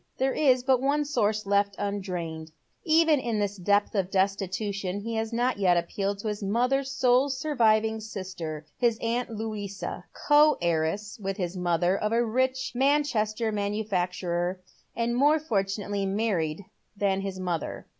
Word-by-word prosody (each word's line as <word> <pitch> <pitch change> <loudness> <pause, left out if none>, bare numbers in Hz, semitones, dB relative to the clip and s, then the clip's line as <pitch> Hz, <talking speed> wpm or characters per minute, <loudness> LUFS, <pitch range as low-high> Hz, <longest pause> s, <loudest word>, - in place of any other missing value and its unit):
There 265 +1 +1
is 260 -4 +3
but 260 -1 +3
one 290 +2 +1
source 215 -7 0
left 200 0 +1
undrained. 180 -6 -4 0.3
Even 320 -3 +4
in 235 -4 -2
this 205 -1 -1
depth 205 +2 +1
of 195 -3 0
destitution 195 0 -1
he 230 +2 -4
has 220 0 -2
not 240 -1 0
yet 180 -3 +4
appealed 195 +4 -2
to 220 - -4
his 210 0 -3
mother's 250 +7 +1
sole 260 +1 +3
surviving 225 -6 +2
eister, 185 -7 -6 0.2
his 235 -2 +2
aunt 235 +2 -1
Louisa, 215 -3 -5 0.2
co 300 +1 +6
heiress 170 +6 -1
with 195 -1 -3
his 180 -2 -3
mother 175 0 +1
of 210 +2 -1
a 235 +1 +2
rich 260 +3 0
Man 280 +4 +3
chester 220 -4 -1
manufacturer, 185 -4 -1 0.4
and 235 0 0
more 290 +5 +4
fortunately 200 -7 -1
married 190 -4 -1 0.3
than 195 -1 +1
liis 195 -1 -4
mother. 175 -4 -3
210 Hz, 150 wpm, -27 LUFS, 190-245 Hz, 0.4 s, co